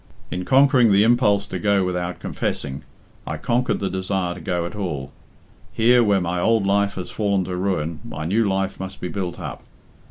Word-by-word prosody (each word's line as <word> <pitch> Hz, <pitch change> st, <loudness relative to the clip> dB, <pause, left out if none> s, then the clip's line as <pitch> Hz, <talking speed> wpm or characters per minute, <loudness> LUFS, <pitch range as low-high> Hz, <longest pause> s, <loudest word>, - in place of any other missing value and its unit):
In 90 Hz, 0 st, -3 dB
conquering 130 Hz, -4 st, +5 dB
the 100 Hz, +1 st, +5 dB
impulse 110 Hz, -4 st, +3 dB
to -, -, -5 dB
go 100 Hz, -2 st, +2 dB
without 90 Hz, -1 st, -2 dB
confessing, 70 Hz, 0 st, -3 dB, 0.5 s
I -, -, -3 dB
conquered 125 Hz, +2 st, 0 dB
the 100 Hz, -, -1 dB
desire 95 Hz, -1 st, -2 dB
to 90 Hz, -, -10 dB
go 85 Hz, 0 st, -1 dB
at 85 Hz, -, -6 dB
all. 85 Hz, -10 st, -4 dB, 0.6 s
Here, 120 Hz, +2 st, +5 dB
where 100 Hz, -3 st, +3 dB
my 90 Hz, +1 st, -1 dB
old 110 Hz, +2 st, +2 dB
life 100 Hz, 0 st, +2 dB
has 90 Hz, -, -6 dB
fallen 100 Hz, -3 st, 0 dB
to 90 Hz, 0 st, -4 dB
ruin, 90 Hz, -4 st, -1 dB
my 75 Hz, +1 st, -6 dB
new 105 Hz, +4 st, +2 dB
life 95 Hz, 0 st, -1 dB
must 95 Hz, 0 st, -6 dB
be 90 Hz, -, -4 dB
built 90 Hz, -3 st, -4 dB
up. -, -, -6 dB
95 Hz, 190 wpm, -22 LUFS, 90-105 Hz, 0.6 s, conquering